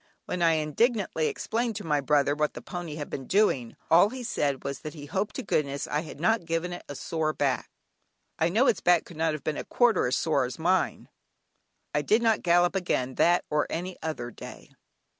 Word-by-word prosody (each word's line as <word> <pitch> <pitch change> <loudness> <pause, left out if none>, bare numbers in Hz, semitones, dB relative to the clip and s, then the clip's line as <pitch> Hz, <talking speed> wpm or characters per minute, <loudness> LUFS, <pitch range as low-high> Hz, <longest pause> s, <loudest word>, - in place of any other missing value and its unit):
When 180 - -3
I 165 -1 +5
indignantly 160 - +1
explained 230 0 -2
to 205 - -5
my 150 -3 +1
brother 145 0 +2
what 150 0 -1
the - - -7
pony 175 -4 -6
had 150 -2 -5
been 135 - -6
doing, 175 - +2 0.2
all 175 +5 +7
he 255 +1 -7
said 145 - -1
was 140 0 -4
that 155 +1 -8
he 145 -2 -8
hoped 195 +8 -2
to 260 - -4
goodness 140 -7 -1
I 150 - 0
had 155 -2 -8
not 215 +2 +2
given 165 +2 -2
it 175 - -7
a 145 - -5
sore 155 +2 -2
back. 135 -4 -1 0.7
I 160 - +3
know 225 +9 +3
its 225 - +2
back 175 -2 +4
could 170 - -12
not 160 0 +1
have 155 -3 -6
been 155 -2 -2
a - - -3
quarter 240 - +2
as 125 - +1
sore 145 -5 +1
as 125 - -5
was 160 - -9
mine! 185 0 +1 0.9
I 150 - +2
did 215 +10 +2
not 225 -2 +3
gallop 175 +1 +3
again 130 -9 -1
that 175 +6 +3
or 150 0 +1
any 180 +2 -4
other 140 -7 -4
day. - - -11
160 Hz, 215 wpm, -27 LUFS, 145-185 Hz, 0.9 s, all